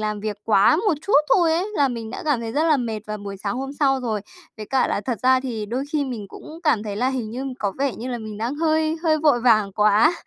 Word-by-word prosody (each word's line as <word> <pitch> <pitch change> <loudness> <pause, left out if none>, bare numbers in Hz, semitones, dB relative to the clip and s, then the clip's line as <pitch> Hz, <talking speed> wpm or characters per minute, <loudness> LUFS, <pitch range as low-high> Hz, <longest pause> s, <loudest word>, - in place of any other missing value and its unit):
làm 210 -1 -2
việc 210 -1 -3
quá 210 +6 +4
một 395 0 +1
chút 405 - -3 0.2
thôi 335 -4 +3
ấy, 350 +4 0
là 280 -2 +3
mình 230 -3 -5
đã - - -6
cảm 290 -6 +1
thấy 225 -1 -5
rất 305 +4 +1
là 315 -2 +4
mệt 230 -4 -3
vào 215 0 -4
buổi 200 -1 -7
sáng 200 +4 -3
hôm 270 +1 -4
sau 275 -2 +1
rồi. 220 -4 -2 0.4
Với 215 - -7
cả 260 +2 +2
là - - -1
thật 235 -1 -3
ra 255 0 +4
thì 230 -5 -4
đôi 250 +6 -3
khi 295 -2 +1
mình 225 -7 -6
cũng 320 - -11
cảm 270 -10 +2
thấy 205 -2 -5
là 250 +4 +1
hình 245 -5 -3
như 255 +3 -5
có 200 -2 -1
vẻ 275 -3 0
như 245 +3 -6
là 240 -1 -3
mình 215 -2 -7
đang 235 +5 -2
hơi 315 +1 +1
hơi 310 -2 +2
vội 295 -6 +3
vàng 215 -5 +3
quá. 210 - +4
245 Hz, 275 wpm, -22 LUFS, 215-290 Hz, 0.4 s, quá